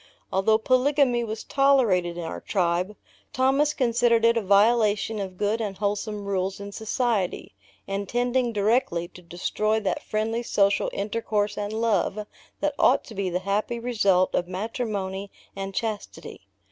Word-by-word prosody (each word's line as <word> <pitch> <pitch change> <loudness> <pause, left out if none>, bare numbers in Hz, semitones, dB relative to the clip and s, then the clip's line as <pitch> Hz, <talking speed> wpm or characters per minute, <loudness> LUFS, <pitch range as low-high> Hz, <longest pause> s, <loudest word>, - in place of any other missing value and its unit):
Although 205 +3 +3
polygamy 255 +1 +2
was 220 -1 -5
tolerated 230 -12 +2
in 175 - -4
our 165 - -5
tribe, 180 +1 0 0.4
Thomas 270 +3 +3
considered 235 -2 +2
it 230 0 +5
a 230 - +1
violation 210 +1 +3
of 190 -2 -5
good 210 +3 0
and 200 -3 -4
wholesome 205 0 -2
rules 195 0 -2
in 200 0 -7
society, 220 - -1 0.3
and 200 0 -3
tending 245 0 +1
directly 205 -5 +1
to 180 - -14
destroy 210 +5 -1
that 200 - -1
friendly 220 +2 -2
social 200 -4 +2
intercourse 210 0 -1
and 205 0 -3
love, 215 -2 0 0.4
that - - +1
ought - - +4
to 225 - -11
be 195 -2 -2
the 180 +1 -2
happy 210 +4 -1
result 205 -6 +2
of 175 - 0
matrimony 200 -1 -4 0.3
and 195 0 -5
chastity. 220 -2 -5
210 Hz, 145 wpm, -25 LUFS, 195-230 Hz, 0.4 s, it